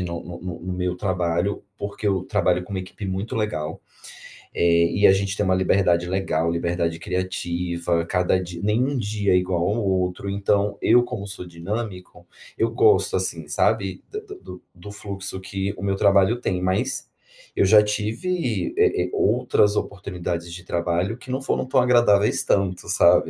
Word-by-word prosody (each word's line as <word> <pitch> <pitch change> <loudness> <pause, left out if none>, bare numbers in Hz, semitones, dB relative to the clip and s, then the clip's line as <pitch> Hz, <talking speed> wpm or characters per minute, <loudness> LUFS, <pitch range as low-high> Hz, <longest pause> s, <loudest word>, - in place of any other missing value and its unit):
no 85 -2 -4
no 85 0 -7
no 90 +2 -5
meu 90 0 -1
trabalho, 90 0 -1
porque 100 +1 -5
eu 95 -2 +1
trabalho 90 -3 +1
com 90 - -13
uma 95 - -2
equipe 95 +2 -8
muito 95 +6 -3
legal, 105 -8 -2 0.7
eh, 85 0 +3
e 100 - +2
a - - +7
gente 100 +1 -1
tem 105 - +1
uma 95 - +2
liberdade 90 -2 +2
legal, 85 -4 0
liberdade 85 0 -1
criativa, 85 -2 -2
cada 90 +1 +2
dia 90 -1 -7
nem 105 +4 +2
um 140 +1 -1
dia 105 -4 0
é - - +5
igual 90 -1 0
ao 105 +1 0
outro, 95 +1 -1
então, 100 +1 0
eu 120 +2 +5
como 110 -5 -5
sou 100 -2 -7
dinâmico, 90 +3 -6 0.3
eu - - +1
gosto, 425 0 +3
assim, - - -3
sabe, - - 0
d 425 - -4 0.2
do - - -10
do 90 +3 -11
fluxo 100 -2 -5
que 95 +1 -3
o - - -7
meu 100 -1 0
trabalho 100 +4 +3
tem, 90 -6 -1
mas 95 +1 -1 0.5
eu - - +3
já 105 +2 +7
tive, 110 - -2
eh 90 - +3
eh, - - -5
outras 110 -3 +2
oportunidades 90 -4 -4
de 90 0 -9
trabalho, 85 +5 -1
que 125 +1 -10
não 130 - -2
foram 135 - -1
tão 130 - +2
agradáveis 120 -5 +4
tanto, 95 -2 0
sabe, - - +4
95 Hz, 175 wpm, -23 LUFS, 90-105 Hz, 0.7 s, a